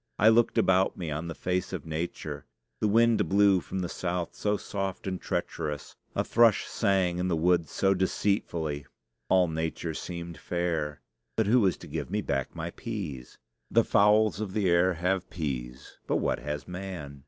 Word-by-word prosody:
I 110 - +6
looked 115 +1 +4
about 95 0 +3
me 85 -4 -4
on 80 +3 -3
the 85 - -5
face 90 0 -1
of 90 -5 -5
nature. 80 +2 -4 0.3
The 110 - +2
wind 115 +2 +4
blew 100 -1 +5
from 95 +2 -4
the 90 - -2
south 85 -1 -3
so 105 0 0
soft 95 -2 -4
and 95 -1 -3
treacherous! 75 -2 -3 0.2
A - - +1
thrush 115 -3 +4
sang 95 -4 +1
in 90 - 0
the 90 - +1
woods 85 0 +2
so 95 0 +2
deceitfully! 85 -6 -1 0.4
All 95 -1 +5
nature 80 0 -3
seemed 85 0 -6
fair. 80 -4 -2 0.3
But 110 - +2
who 120 +5 +5
was 95 -5 +2
to - - -11
give 75 -2 -4
me 105 0 -1
back 70 -2 -2
my 85 0 -4
peas? 85 - -6 0.3
The 115 - +4
fowls 105 -1 +4
of 100 -3 -4
the 105 -3 +1
air 90 +1 +4
have 90 +2 -1
peas; 65 -6 -5
but - - +1
what - - 0
has 75 -2 -5
man? 90 -6 -6
90 Hz, 175 wpm, -28 LUFS, 80-100 Hz, 0.4 s, I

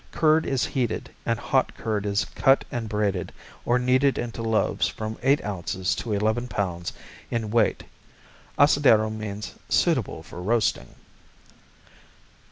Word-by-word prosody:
Curd 160 0 +3
is 135 -2 +1
heated, 120 -5 -2 0.2
and 115 -1 +1
hot 130 +3 0
curd 105 -2 -2
is 100 0 +1
cut 135 -1 +3
and 115 -3 -3
braided 100 -4 -1 0.3
or 120 - +3
kneaded 130 +2 +2
into 120 -1 -4
loaves 110 -1 +1
from 110 0 -5
eight 135 +3 +2
ounces 95 -2 -2
to 115 - -4
eleven 110 +4 0
pounds 90 -6 -3 0.4
in 110 -3 -2
weight 115 -2 +2 0.7
Asadero 130 -7 +5
means 105 -1 -6 0.2
"suitable - - +1
for 90 - -9
roasting." 110 +4 0
110 Hz, 130 wpm, -25 LUFS, 105-125 Hz, 0.7 s, Asadero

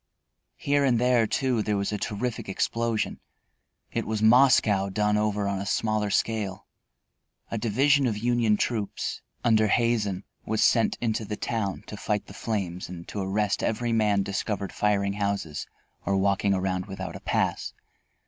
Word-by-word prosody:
Here 145 0 +1
and 130 -4 +3
there, 120 -1 +3
too, 125 -1 +1
there 105 -1 0
was 100 +1 -1
a 105 - -1
terrific 115 +1 -3
explosion. 115 +3 -1 0.7
It - - -2
was 110 0 -1
Moscow 110 -4 +5
done 105 +2 +1
over 105 -1 0
on 100 -1 -1
a 100 - -4
smaller 110 -1 0
scale. 105 -1 -1 0.9
A 115 - -2
division 135 +5 +3
of 110 -3 -1
Union 115 -1 +2
troops, 110 -3 -2 0.2
under 110 -2 +4
Hazen, 105 -4 +1 0.2
was 110 0 0
sent 115 -2 +3
into 110 -1 0
the 105 0 -5
town 100 -5 -2
to 105 - -8
fight 105 0 -1
the - - -12
flames 95 -5 -3
and 85 -2 -8
to 105 - -4
arrest 100 +1 0
every 120 +2 -1
man 105 -3 +2
discovered 100 0 -3
firing 100 -1 +1
houses 100 -7 -2 0.4
or 100 0 +1
walking 100 0 +2
around 95 0 -1
without 95 -1 -6
a - - -6
pass. - - -1
105 Hz, 160 wpm, -26 LUFS, 100-115 Hz, 0.9 s, Moscow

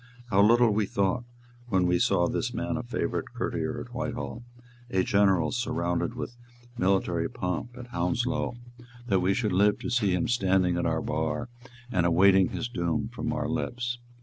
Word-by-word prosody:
How 100 - +5
little 115 +2 +5
we 105 -1 +1
thought, 100 +6 0 0.4
when 95 -5 +2
we 90 0 +2
saw - - +3
this - - -2
man - - -2
a - - -2
favourite - - -2
courtier - - -2
at - - -9
Whitehall, 120 - -4 0.5
a 95 -5 +2
general 95 -6 +3
surrounded 90 -1 -1
with 120 -1 -6 0.4
military 90 -5 +1
pomp 120 +1 -4
at 125 0 -9
Hounslow, 120 +7 -1 0.5
that 95 -5 +2
we 95 +2 +2
should 110 -6 0
live 100 +2 +4
to 125 - -5
see 105 -7 +2
him 125 - 0
standing 95 -6 +2
at 85 - 0
our 80 -1 0
bar, 80 +10 -2 0.4
and 90 -6 +2
awaiting 95 +2 +5
his - - -3
doom 85 -2 -1
from 120 0 -4
our 125 - -1
lips! 120 0 -2
100 Hz, 170 wpm, -28 LUFS, 90-120 Hz, 0.5 s, How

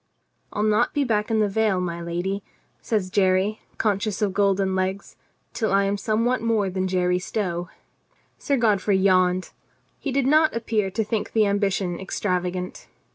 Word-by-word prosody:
"I'll 210 - -1
not 215 +5 +2
be 290 - +2
back 215 -4 0
in 220 -1 +2
the 210 - +3
vale, 210 -1 +1
my 170 -1 -3
lady," 175 +4 -3 0.4
says 205 -5 -1
Jerry, 190 +2 +2 0.2
conscious 205 -1 0
of 200 -2 0
golden 195 -1 +2
legs, 190 +1 -2 0.4
"till 225 -3 -1
I 195 0 +4
am 195 +1 0
somewhat 230 +4 0
more 220 -4 +1
than 185 0 -1
Jerry 180 -1 +1
Stow." 180 -3 -3 0.7
Sir 280 - 0
Godfrey 210 -4 +2
yawned. 185 -1 +2 0.5
He 280 - -3
did 270 0 +1
not 310 +1 +4
appear 220 -3 0
to 220 +4 -1
think 215 0 -3
the 220 -2 +4
ambition 195 -3 0
extravagant. 180 -1 -3
200 Hz, 160 wpm, -24 LUFS, 185-220 Hz, 0.7 s, I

